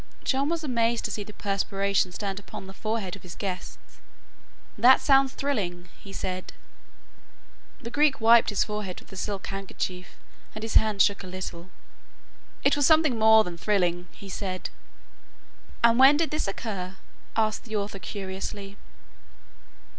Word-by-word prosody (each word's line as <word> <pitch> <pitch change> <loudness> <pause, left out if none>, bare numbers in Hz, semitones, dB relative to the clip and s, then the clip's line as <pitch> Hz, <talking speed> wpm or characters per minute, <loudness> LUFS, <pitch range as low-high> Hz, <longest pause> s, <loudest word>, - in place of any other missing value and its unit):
John 275 +2 +1
was 335 -1 -2
amazed 235 -4 +1
to - - -2
see 210 - -3
the 210 - -11
perspiration 195 -1 0
stand 195 +1 -4
upon 195 - -9
the 190 - -10
forehead 215 -3 -3
of 200 - -14
his 180 - -10
guest. 185 -3 -5 1.0
"That 245 +4 +7
sounds 270 -1 +4
thrilling," 185 -11 -2
he 195 - -12
said. 185 -1 -5 1.3
The 235 - -8
Greek 290 -1 +3
wiped 230 0 +6
his 205 - +2
forehead 210 -4 -5
with - - -18
a - - -9
silk 195 0 -3
handkerchief 190 -2 -5 0.4
and 215 - -6
his 225 - -3
hand 215 -3 +5
shook 200 -1 +1
a - - -8
little. 180 -1 -7 0.9
"It 275 - +4
was 290 -2 +3
something 310 -7 +4
more 220 0 +7
than 175 -3 -7
thrilling," 180 -3 0
he 200 - -12
said. 185 -1 -4 1.1
"And 235 +1 +5
when 270 +3 +8
did 325 0 0
this 305 -8 -1
occur?" 195 -3 -5 0.4
asked 215 -1 0
the 220 -2 -5
author 200 -1 -3
curiously. 195 0 -6
205 Hz, 155 wpm, -26 LUFS, 190-235 Hz, 1.3 s, when